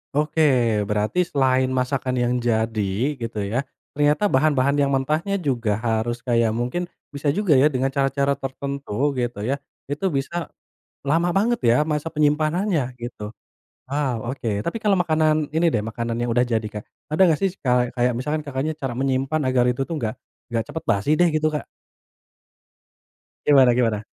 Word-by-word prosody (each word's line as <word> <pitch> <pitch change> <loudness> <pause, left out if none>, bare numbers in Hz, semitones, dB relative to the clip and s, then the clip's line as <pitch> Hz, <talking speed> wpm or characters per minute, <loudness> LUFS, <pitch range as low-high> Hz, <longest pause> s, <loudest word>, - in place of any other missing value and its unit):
Oke, 150 +2 0 0.5
berarti 105 - 0
selain 130 -3 +2
masakan 130 0 -1
yang 120 0 +1
jadi 110 0 0
gitu 115 -3 -3
ya, 120 +8 -2 0.2
ternyata 150 +6 +2
bahan 145 +2 +3
bahan 140 +3 +2
yang 140 - +3
mentahnya 150 +8 0
juga 125 - 0
harus 120 +1 -1
kayak 115 -3 +2
mungkin 125 +10 -2 0.2
bisa 145 +1 -4
juga 205 -6 0
ya 145 - +6
dengan 135 -2 0
cara 135 0 +1
cara 140 +1 0
tertentu 140 -1 -2
gitu 120 -4 -2
ya, 135 +5 -1 0.3
itu 145 +7 -2
bisa, 165 +2 -2 0.6
lama 165 +4 +2
banget 225 +6 +1
ya 115 0 +5
masa 150 +1 -2
penyimpanannya, 155 0 +1
gitu. 120 -3 -6 0.6
Waw, 130 -5 -1
oke. 110 -6 -2
Tapi 170 - -3
kalau 210 -3 +2
makanan 155 -2 +1
ini 160 +3 +2
deh, 110 - +1
makanan 115 +1 -3
yang 120 - -1
udah 120 +2 +2
jadi, 115 -2 0
Kak. 105 0 -7 0.3
Ada 155 - -2
nggak 160 -4 +2
sih 195 -2 0
kale 125 -2 +1
kayak 125 0 +2
misalkan 150 +6 -2
Kakaknya 140 +3 -2
cara 135 -4 -3
menyimpan 135 +4 0
agar 130 -2 +2
itu 125 +2 0
tuh 170 - -3
nggak, 110 -4 -2 0.4
nggak 115 -1 +1
cepet 160 - -6
basi 100 +8 +1
deh 175 - +5
gitu, 155 0 +2
Kak? 150 -2 -4 1.8
Gimana 135 -4 +6
gimana? 115 -4 +1
135 Hz, 165 wpm, -23 LUFS, 120-150 Hz, 1.8 s, ya